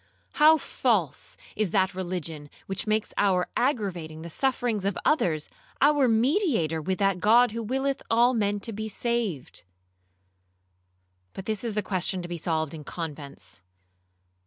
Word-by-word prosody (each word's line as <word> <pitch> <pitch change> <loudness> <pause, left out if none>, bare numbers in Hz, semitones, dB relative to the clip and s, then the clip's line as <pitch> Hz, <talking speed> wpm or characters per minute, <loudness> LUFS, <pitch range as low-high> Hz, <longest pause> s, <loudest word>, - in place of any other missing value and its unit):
how 310 +1 +6
false 205 - -1 0.2
is 215 -3 0
that 190 +1 +2
religion 175 -5 -5 0.2
which 195 +2 -3
makes 215 0 0
our 185 -3 +2
aggravating 180 - -1
the 170 - -7
sufferings 245 - 0
of 200 -1 -1
others 160 - +2 0.3
our 285 -1 +4
mediator 230 - +2
with 185 +4 -1
that 195 -1 +1
God 230 +4 +5
who 230 +1 -4
willeth 265 +4 -1
all 235 +2 +4
men 205 -3 0
to 225 - -5
be 220 +1 -4
saved. 220 - -2 1.7
But 195 - -7
this 215 -1 -1
is 225 -3 -3
a 210 - +1
question 185 -1 -1
to - - -5
be 175 0 -4
solved 160 -2 -1
in 155 -2 -8
convents. 140 - -7
200 Hz, 145 wpm, -27 LUFS, 170-235 Hz, 1.7 s, how